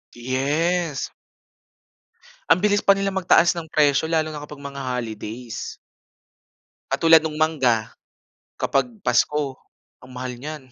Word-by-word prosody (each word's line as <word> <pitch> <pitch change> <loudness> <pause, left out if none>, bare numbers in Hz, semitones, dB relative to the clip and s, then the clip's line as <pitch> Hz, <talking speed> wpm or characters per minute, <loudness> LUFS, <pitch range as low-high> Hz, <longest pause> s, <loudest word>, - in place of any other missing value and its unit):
Yes. 145 +6 -1 1.4
Ang - - +6
bilis 205 0 +2
pa - - +6
nila 195 0 +1
mag-taas 180 -2 +4
ng 165 -2 -7
presyo, 150 +2 +2
lalo 160 -1 +2
na 150 -1 -7
kapag 150 -1 -10
mga 140 -1 -7
holidays. 115 -1 -5 1.1
Katulad 165 -1 +6
nung 155 -1 -4
mangga, 130 -9 +1 0.7
kapag - - +1 0.2
pasko, 145 -3 +1 0.4
ang 130 - -14
mahal 125 0 -5
niyan. 140 -2 -8
150 Hz, 120 wpm, -23 LUFS, 130-165 Hz, 1.4 s, Ang